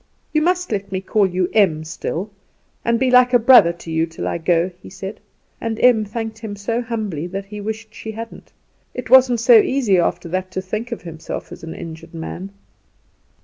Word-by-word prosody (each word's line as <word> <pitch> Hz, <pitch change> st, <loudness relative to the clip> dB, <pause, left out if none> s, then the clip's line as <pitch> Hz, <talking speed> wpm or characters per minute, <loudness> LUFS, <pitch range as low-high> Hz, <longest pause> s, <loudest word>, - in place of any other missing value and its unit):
"You 305 Hz, -, +3 dB
must 360 Hz, 0 st, 0 dB
let 200 Hz, -2 st, -3 dB
me 190 Hz, -, -1 dB
call 200 Hz, +1 st, +2 dB
you 180 Hz, 0 st, 0 dB
Em 180 Hz, -8 st, +3 dB
still, 170 Hz, +5 st, -4 dB, 0.5 s
and 235 Hz, 0 st, +1 dB
be 260 Hz, -1 st, +2 dB
like 250 Hz, 0 st, +6 dB
a -, -, +9 dB
brother 235 Hz, -7 st, +7 dB
to 170 Hz, -1 st, -10 dB
you 160 Hz, +1 st, +1 dB
till 165 Hz, -, -5 dB
I -, -, -2 dB
go," 170 Hz, +2 st, +1 dB
he -, -, -11 dB
said; 190 Hz, +2 st, -7 dB, 0.4 s
and 225 Hz, -1 st, -3 dB
Em 235 Hz, -4 st, +5 dB
thanked 220 Hz, +1 st, -5 dB
him 220 Hz, -3 st, -6 dB
so 225 Hz, +4 st, -2 dB
humbly 215 Hz, -9 st, -3 dB
that 195 Hz, +2 st, -5 dB
he 210 Hz, +1 st, -8 dB
wished 220 Hz, +1 st, -6 dB
she 220 Hz, -, -7 dB
hadn't. 230 Hz, +1 st, -9 dB, 0.4 s
It 250 Hz, -2 st, -6 dB
wasn't 255 Hz, -3 st, +6 dB
so 235 Hz, 0 st, +8 dB
easy 225 Hz, -7 st, +2 dB
after 175 Hz, -, 0 dB
that 185 Hz, +2 st, -2 dB
to 190 Hz, -, -2 dB
think 215 Hz, +5 st, -4 dB
himself 170 Hz, -9 st, -7 dB
an 165 Hz, 0 st, -8 dB
injured 165 Hz, 0 st, -9 dB
man. 175 Hz, +4 st, -6 dB
210 Hz, 190 wpm, -20 LUFS, 175-230 Hz, 0.5 s, a